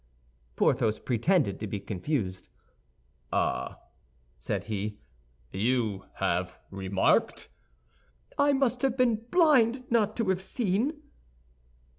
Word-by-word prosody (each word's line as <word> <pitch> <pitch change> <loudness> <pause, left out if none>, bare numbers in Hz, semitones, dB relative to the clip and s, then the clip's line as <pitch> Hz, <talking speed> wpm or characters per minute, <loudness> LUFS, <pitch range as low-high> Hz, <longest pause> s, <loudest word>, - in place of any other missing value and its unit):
Porthos 110 -1 +2
pretended 130 - +1
to 110 - -4
be 100 0 -3
confused. 100 - -3 0.8
"Ah," - - -1 0.6
said - - -2
he, 105 0 -4 0.5
"you 110 -2 0
have 90 +1 -1
remarked—" 95 0 +1 0.9
"I 285 0 +4
must 255 -3 +1
have 265 -2 +1
been 245 -4 +3
blind 265 -8 +4
not 215 -2 +2
to 230 -5 0
have 190 -1 +1
seen." 235 - -1
160 Hz, 100 wpm, -28 LUFS, -, 0.9 s, I